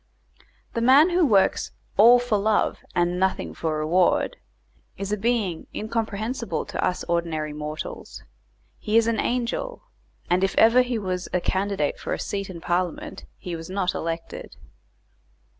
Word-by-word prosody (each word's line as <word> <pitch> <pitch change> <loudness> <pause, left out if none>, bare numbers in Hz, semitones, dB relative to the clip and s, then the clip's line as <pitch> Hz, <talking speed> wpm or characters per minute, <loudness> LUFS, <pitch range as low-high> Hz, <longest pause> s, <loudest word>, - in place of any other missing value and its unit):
The 230 - -1
man 275 +8 +6
who 350 0 +3
works 205 -10 +2 0.2
"all 235 +4 +8
for 245 -4 0
love 215 +1 +1 0.2
and 175 0 +1
nothing 190 0 0
for 160 -2 -2
reward" 170 +4 +2 0.6
is 195 0 -4
a - - +2
being 210 -6 -1
incomprehensible 225 +2 -3
to - - -4
us 180 - -1
ordinary 165 -3 -2
mortals; 150 +1 -7 0.6
he 215 +1 +1
is 230 - +5
an 230 -2 0
angel, 250 - -2 0.4
and 180 +2 +2
if 195 - 0
ever 230 +3 +6
he 250 -1 -1
was 185 -3 -3
a 180 - +2
candidate 190 -5 -1
for - - -3
a - - -3
seat 195 -1 -4
in 170 -3 -8
Parliament 175 0 -2
he 175 -2 -6
was 165 +1 -8
not 185 -1 -1
elected. 165 0 -5
195 Hz, 150 wpm, -24 LUFS, 175-230 Hz, 0.6 s, all